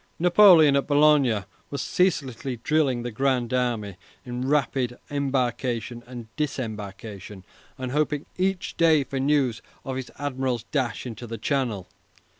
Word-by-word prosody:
Napoleon, 175 -4 +7
at 140 - +1
Boulogne, 145 -8 +4 0.2
was 140 - -4
ceaselessly 135 -8 0
drilling 140 -6 +1
the 120 - -4
Grand 130 0 0
Army 115 -6 -1 0.3
in 125 +1 -4
rapid 135 -3 0
embarkation 125 -4 -1
and 120 -2 -8
disembarkation, 105 -8 -5 0.3
and 130 -1 -4
hoping 150 0 0
each 190 0 -1
day 160 -3 +4
for 135 0 -4
news 135 -4 +1 0.2
of 130 -1 -3
his 130 -2 -5
admiral's 130 -4 -2
dash 125 -3 -2
into 120 0 -7
the 115 0 -5
Channel. 115 -6 -1
130 Hz, 130 wpm, -25 LUFS, 120-145 Hz, 0.3 s, Napoleon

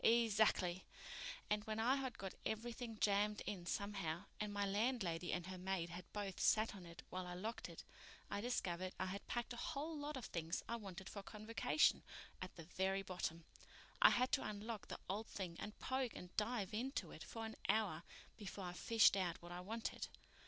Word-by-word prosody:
"E 235 0 +7
zackly. 190 -4 +4 0.7
And 210 0 +2
when 220 0 -1
I 250 +5 +5
had 260 -3 -2
got 195 -1 -4
everything 230 +1 -2
jammed 210 +1 +3
in 185 -4 -3
somehow, 195 -4 -1
and 210 -1 -1
my 205 0 +1
landlady 200 -5 +1
and 175 -1 0
her 185 0 -5
maid 180 -2 0
had 175 +1 -7
both 200 -3 -3
sat 220 +1 +5
on 180 -3 -8
it 170 -1 -9
while 185 0 -2
I 180 - -4
locked 220 +6 -3
it, - - -8 0.4
I 205 - -1
discovered 185 -6 0
I 190 - +2
had 195 +2 -4
packed 240 0 -1
a - - -6
whole 310 +5 -2
lot 295 -1 -3
of 255 - -4
things 165 -1 -1
I 235 - 0
wanted 190 -4 -6
for 200 - -5
Convocation 220 +7 +3 0.4
at 185 - -5
the 165 - -7
very 190 +3 +1
bottom. 170 -3 -2 0.6
I - - +11
had 255 +1 +3
to 270 - +3
unlock 215 +1 -3
the - - -4
old 210 +4 -1
thing 180 -4 -4
and 210 - -5
poke 260 -2 0
and 180 0 -8
dive 210 -2 +1
into 255 +6 -1
it - - -7
for 225 -1 -4
an 220 - -5
hour 200 -7 +3 0.4
before 200 -1 -5
I 175 - -3
fished 225 +3 +6
out 180 -4 +1
what 175 0 -9
I 175 - -3
wanted. 220 +5 -2
205 Hz, 195 wpm, -42 LUFS, 185-225 Hz, 0.7 s, I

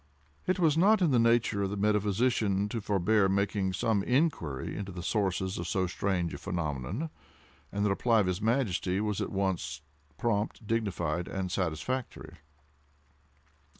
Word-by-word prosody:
It 185 - +2
was 160 -3 +3
not 210 +4 +5
in 165 - +3
the 125 - +4
nature 115 -3 +3
of 100 - 0
the 100 - -4
metaphysician 105 0 +1
to 115 +1 -3
forbear 100 0 +2
making 100 -1 0
some 110 +1 +1
inquiry 125 - 0
into 100 -1 -5
the 90 -1 -7
sources 95 -2 -1
of 85 - -3
so 95 +2 +1
strange 90 -1 -1
a - - -6
phenomenon, 90 - -3 0.6
and 100 +1 -1
the - - +3
reply 115 +3 +3
of - - 0
his 90 +1 -1
Majesty 105 -5 +1
was 105 -1 -1
at - - -3
once 95 -8 -2 0.4
prompt, 110 0 -1
dignified, 90 -7 -1
and 95 -2 -3
satisfactory. 90 +1 -3
100 Hz, 150 wpm, -30 LUFS, 90-115 Hz, 0.6 s, not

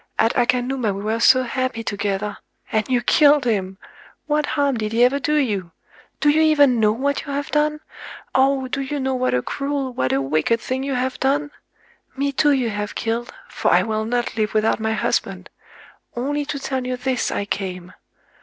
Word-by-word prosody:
At 225 - +3
Akanuma 245 -3 +1
we 200 - -6
were 220 +2 -1
so 255 +2 +5
happy 255 -2 -2
together,—and 205 +1 -3
you 245 -2 +1
killed 290 +1 +5
him!... 195 -5 -1 0.5
What 300 -1 0
harm 280 -3 0
did 215 0 -3
he 235 +2 +4
ever 265 +3 +3
do 300 +3 0
you? 210 - 0 0.5
Do 295 - +3
you 310 +2 +4
even 290 -6 +4
know 210 -1 +4
what 275 +6 -1
you - - -4
have 285 +1 -3
done?—oh! 280 -3 -1
do 275 - -2
you 280 +2 -3
know 265 0 -1
what 255 - 0
a 125 - 0
cruel, 275 -2 -3
what 130 - -1
a 135 - +2
wicked 155 +11 +1
thing 255 +3 -3
you 275 -1 -2
have 255 +1 -2
done?... 285 +2 0 0.7
Me 280 +1 0
too 295 +2 +2
you 255 -5 +1
have 205 0 -4
killed,—for 235 +1 -3
I - - +5
will 220 -1 -2
not 240 +1 -2
live 215 -1 -1
without 215 +1 +2
my 220 0 -1
husband!... 190 -4 -2 0.6
Only 290 +4 -2
to 285 - -4
tell 265 -2 -3
you 255 0 -2
this 255 0 -1
I 200 - -2
came."... 185 -3 -4
250 Hz, 185 wpm, -21 LUFS, 215-275 Hz, 0.7 s, so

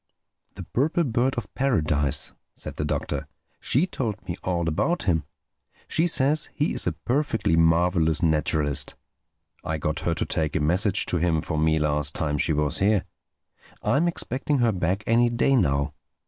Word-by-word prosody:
"The - - -7
Purple 155 +7 0
Bird 125 0 0
of 120 - -5
Paradise," 75 - +1 0.2
said - - -6
the - - -1
Doctor—"she 140 +8 -2
told 110 - -4
me 85 - -3
all 85 -2 -1
about 105 - 0
him. 80 -5 +1 0.6
She 165 +2 +1
says 150 -1 +2
he 150 - 0
is - - +1
a - - +1
perfectly 125 - 0
marvelous 80 0 +2
naturalist. 75 -3 0 0.7
I 80 - -2
got 75 - -2
her - - -1
to - - -1
take 80 -2 -2
a - - +2
message 90 +7 +2
to 90 - +1
him 85 -1 +1
for 80 -3 -2
me 80 0 +2
last 75 -1 0
time 75 -2 -1
she 80 - +1
was 75 -2 +1
here. 100 0 +2 0.8
I - - +2
am 170 +4 +2
expecting 145 -3 -1
her 120 -3 +3
back 95 +1 -1
any 120 +1 +3
day 120 +3 +2
now. 70 - +1
90 Hz, 165 wpm, -25 LUFS, 80-125 Hz, 0.8 s, her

